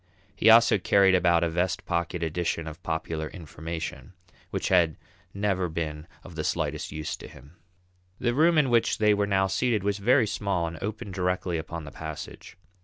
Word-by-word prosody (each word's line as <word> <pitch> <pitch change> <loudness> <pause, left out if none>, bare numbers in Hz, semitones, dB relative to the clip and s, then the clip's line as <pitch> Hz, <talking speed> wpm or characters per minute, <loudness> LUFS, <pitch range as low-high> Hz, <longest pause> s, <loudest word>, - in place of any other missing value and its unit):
He 110 - +4
also 115 -2 +7
carried 95 +1 +4
about 85 -2 +3
a 85 - +1
"Vest 90 0 -1
Pocket 85 0 -2
Edition 85 0 -2
of 80 +2 -8
Popular 80 -1 -3
Information," 80 0 -7 0.4
which - - -2
had 85 -4 +3 0.3
never 95 -3 -1
been 80 -1 -4 0.2
of 90 - -11
the 80 -1 -4
slightest 75 -2 -2
use 75 0 -4
to - - -10
him. 70 +7 -16 0.6
The 120 - 0
room 160 +5 +4
in 140 -5 +3
which 115 -1 +3
they 105 -1 +4
were 100 0 +1
now 95 -1 +2
seated 105 +2 0
was 100 0 -1
very 125 +4 +4
small 100 -5 -1
and 80 -1 -6
opened 105 -1 -5
directly 90 -2 -1
upon 80 +1 -6
the 75 - -9
passage. 80 +1 -8
90 Hz, 180 wpm, -27 LUFS, 80-100 Hz, 0.6 s, also